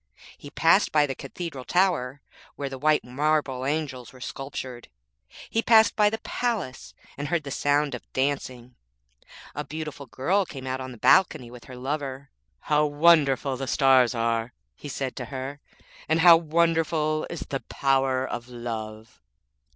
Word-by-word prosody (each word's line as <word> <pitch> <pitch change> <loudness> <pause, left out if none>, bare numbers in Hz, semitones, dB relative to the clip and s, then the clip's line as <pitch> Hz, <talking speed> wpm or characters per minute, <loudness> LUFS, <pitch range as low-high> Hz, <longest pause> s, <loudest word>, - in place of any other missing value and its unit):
He 145 - -12
passed 165 +6 +3
by 150 -1 +4
the 135 - -3
cathedral 135 +1 -7
tower, 150 -6 +1 0.3
where 140 -1 -4
the 135 -1 -7
white 155 +2 +3
marble 135 0 -1
angels 145 -4 -3
were 130 - -15
sculptured. 130 -2 -7 0.6
He 225 - 0
passed 220 -1 +5
by 210 -1 +4
the 220 - -3
palace 220 - -4 0.2
and 145 - -3
heard 165 +1 0
the 140 - -7
sound 145 +1 +1
of - - -9
dancing. 130 -3 -2 0.8
A 145 - -4
beautiful 150 -1 -7
girl 185 +10 +1
came 135 -7 -9
out 130 0 -3
on 130 0 -6
the 120 - -11
balcony 150 - +3
with 125 -1 -12
her 130 - -10
lover. 135 +1 -5 0.3
'How 150 0 +2
wonderful 145 -3 +3
the 135 +1 -4
stars 130 -3 +4
are,' 115 +1 -1 0.2
he 145 - -9
said 135 -1 -4
to 125 - -4
her,'and 140 +4 -5
how 170 -1 +9
wonderful 165 -1 +1
is 170 - -6
the 135 - -4
power 135 -1 0
of 120 -1 -6
love!' 110 -2 -7
140 Hz, 155 wpm, -25 LUFS, 130-155 Hz, 0.8 s, how